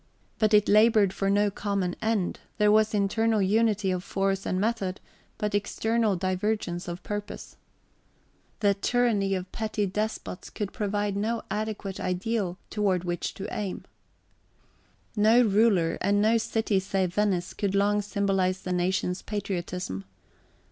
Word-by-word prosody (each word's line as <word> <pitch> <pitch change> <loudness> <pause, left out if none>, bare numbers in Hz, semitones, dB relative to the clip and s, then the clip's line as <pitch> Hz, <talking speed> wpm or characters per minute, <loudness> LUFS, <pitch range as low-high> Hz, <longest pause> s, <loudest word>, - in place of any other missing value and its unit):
But 215 -1 +4
it 210 0 +4
laboured 215 -2 +5
for 195 0 -1
no 205 +1 +3
common 195 -3 -2
end; 220 -5 0 0.2
there 210 -1 +4
was 215 0 +3
internal 220 +2 +2
unity 210 0 +2
of 180 -1 -2
force 195 0 -1
and 185 - 0
method, 205 -3 -1 0.4
but 210 0 -2
external 215 +1 +1
divergence 185 -1 -2
of 175 +1 -6
purpose. 205 0 -6 1.1
The 200 -1 +4
tyranny 205 -2 +1
of 185 0 -5
petty 215 -1 -2
despots 210 -1 -4
could 205 -3 -5
provide 205 -1 -1
no 225 +3 -1
adequate 210 -2 -3
ideal 185 0 -1
toward 200 -4 +1
{xxii} - - -8
which 175 -1 -2
to 195 - -6
aim. 200 -3 -4 1.3
No 220 +3 +5
ruler, 200 -6 +3
and 205 0 +2
no 220 +2 +4
city 220 -3 0
save 190 -2 -1
Venice, 190 -4 0
could 200 -1 -1
long 205 +1 +3
symbolize 195 -2 0
the 180 - -3
nation's 180 0 0
patriotism. 180 - -4
200 Hz, 140 wpm, -27 LUFS, 185-215 Hz, 1.3 s, laboured